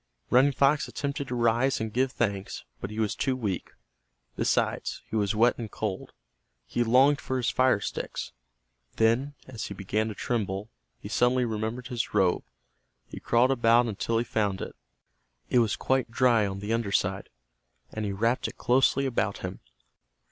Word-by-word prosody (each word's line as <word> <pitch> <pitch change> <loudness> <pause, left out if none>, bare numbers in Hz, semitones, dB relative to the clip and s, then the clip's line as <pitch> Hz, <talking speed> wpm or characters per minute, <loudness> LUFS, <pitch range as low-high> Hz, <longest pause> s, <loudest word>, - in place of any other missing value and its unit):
Running 130 +3 +5
Fox 140 +2 +2
attempted 140 0 -4
to 125 - -3
rise 120 +3 +2
and 110 -1 -4
give 130 +1 +1
thanks, 100 -5 -2 0.2
but 95 - -5
he 105 - -8
was 110 -2 0
too 135 -2 0
weak. 105 -8 -3 0.7
Besides, - - 0
he - - -6
was 105 0 +1
wet 120 +3 +3
and 115 -2 -5
cold. 105 -3 -4 0.5
He 120 - 0
longed 130 +5 +4
for 130 - -2
his 125 - 0
fire 130 -4 +3
sticks. - - -5 0.6
Then, 120 +6 +2
as 120 -4 -6
he 100 - -7
began 105 +3 -1
to 110 - -5
tremble, 105 -3 -2 0.3
he - - -8
suddenly 125 +1 +2
remembered 110 +3 -3
his 120 -4 -3
robe. 95 -3 +3 0.7
He - - -8
crawled 120 +3 +3
about 120 -1 +4
until 115 +1 -1
he 115 - +2
found 105 -5 -1
it. - - -6 0.8
It - - +5
was 115 -4 +2
quite 130 -2 0
dry 115 -3 +3
on 95 0 -5
the 105 +2 -2
under 115 -3 -1
side, 100 -1 0 0.6
and 110 - -4
he 100 - -1
wrapped 115 +6 0
it - - -9
closely 130 +2 +3
about 130 -3 -1
him. - - -6
115 Hz, 170 wpm, -27 LUFS, 105-130 Hz, 0.8 s, Running